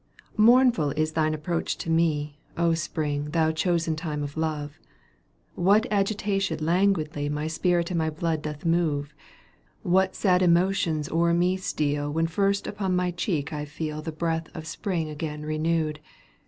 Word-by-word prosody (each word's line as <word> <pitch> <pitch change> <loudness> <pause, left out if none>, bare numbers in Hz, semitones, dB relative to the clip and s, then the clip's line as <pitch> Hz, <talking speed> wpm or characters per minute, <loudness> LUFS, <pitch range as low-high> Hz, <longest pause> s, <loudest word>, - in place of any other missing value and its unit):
Mournful 235 - +5
is 155 0 +1
thine 155 -1 +1
approach 165 +2 -2
to - - -7
me, 155 -3 +1 0.2
^ 170 -1 +3
Spring, 150 -3 -2
thou 160 +1 +1
chosen 165 0 0
time 155 -2 -3
of 145 0 -6
love 155 -1 -3 0.8
I - - -7
What 205 +5 +5
agitation 200 -3 0
languidly 160 -3 +1
My 150 +1 -2
spirit 170 +2 0
and 170 - 0
my 160 0 +1
blood 160 0 -2
doth 150 +1 -6
move, 155 -4 +1 0.7
What 185 +1 +2
sad 185 -3 +3
emotions 170 -3 +2
o'er 170 +1 +2
me 180 +2 +2
steal 145 -5 -1
When 165 +2 +1
first 195 +4 0
upon 195 -3 -2
my 180 0 +1
cheek 165 -4 -2
I 150 -1 -3
feel 155 0 -5
The 160 - -5
breath 165 +1 -2
of 160 - -6
Spring 165 0 -2
again 150 0 -5
renewed. 155 0 -1
160 Hz, 155 wpm, -26 LUFS, 155-180 Hz, 0.8 s, Mournful